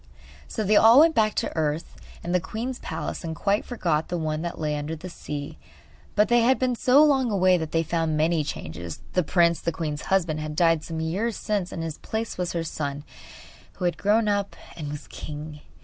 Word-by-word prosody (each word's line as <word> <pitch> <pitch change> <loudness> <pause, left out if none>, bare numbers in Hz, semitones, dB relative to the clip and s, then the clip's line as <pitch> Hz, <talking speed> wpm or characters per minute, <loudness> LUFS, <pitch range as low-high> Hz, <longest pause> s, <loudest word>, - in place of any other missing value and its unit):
So 220 - -3
they 210 +1 +3
all 230 +5 +8
went 325 0 +5
back 215 -5 +2
to - - -2
earth 155 0 -2 0.3
and 175 - -2
the 180 - +4
queen's 240 +8 -5
palace, - - -5
and 160 -1 -4
quite 200 +5 +1
forgot 165 -10 -1
the 175 - -2
one 155 -1 -2
that 170 0 -4
lay 150 -1 -1
under 150 +2 -3
the 175 +3 -8
sea. 145 -3 -6 0.6
But 210 +1 +4
they 240 0 +4
had 255 +3 +4
been 255 -1 +1
so 260 +5 +5
long 270 -5 +3
away 185 -3 +4
that 160 -1 -4
they 165 0 +2
found 165 -1 0
many 160 0 +2
changes. 85 - -6
The 180 - +3
prince, 170 0 +3
the 170 - -1
queen's 155 -2 -4
husband, 170 -5 +1
had 155 0 -5
died 165 -1 +3
some 160 -1 -4
years 195 +8 -1
since, 205 -4 -2
and 165 - -4
in - - -3
his 160 -2 -6
place 220 0 -3
was 180 -1 -2
her 170 -1 -1
son, 145 -2 -4 0.7
who 180 - -4
had 175 - 0
grown 215 +2 +3
up 200 -1 0 0.2
and 150 -4 -5
was 150 0 -6
king! 150 0 -7
170 Hz, 215 wpm, -25 LUFS, 155-210 Hz, 0.7 s, all